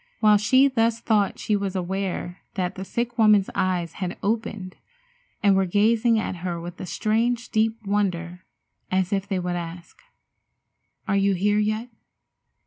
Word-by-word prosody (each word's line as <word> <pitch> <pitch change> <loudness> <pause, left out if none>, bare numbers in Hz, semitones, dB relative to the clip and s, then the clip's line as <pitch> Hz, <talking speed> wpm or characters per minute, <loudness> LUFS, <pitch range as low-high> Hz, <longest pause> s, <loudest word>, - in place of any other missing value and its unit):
While 210 -1 +6
she 260 +6 +4
thus 230 -3 +1
thought 210 -4 +1
she 210 - 0
was 200 -1 -2
aware 185 0 -3 0.2
that 180 -2 -1
the 190 - -6
sick 235 +4 -3
woman's 210 -3 +5
eyes 175 -3 -1
had 180 -1 -3
opened 210 -3 -2 0.7
and 200 -1 +5
were 190 -1 +2
gazing 225 +4 +3
at 215 -4 -2
her 175 -1 -4
with 175 +1 -8
a 185 - -6
strange, 230 +6 0
deep 220 +1 +1
wonder, 180 -3 -1 0.5
as 185 +1 0
if 195 0 -1
they 195 - -1
would 180 -1 -2
ask: 170 0 -7 1.1
"Are 200 - +1
you 195 0 +2
here 205 +3 +2
yet? 215 +3 -1
200 Hz, 155 wpm, -24 LUFS, 185-220 Hz, 1.1 s, While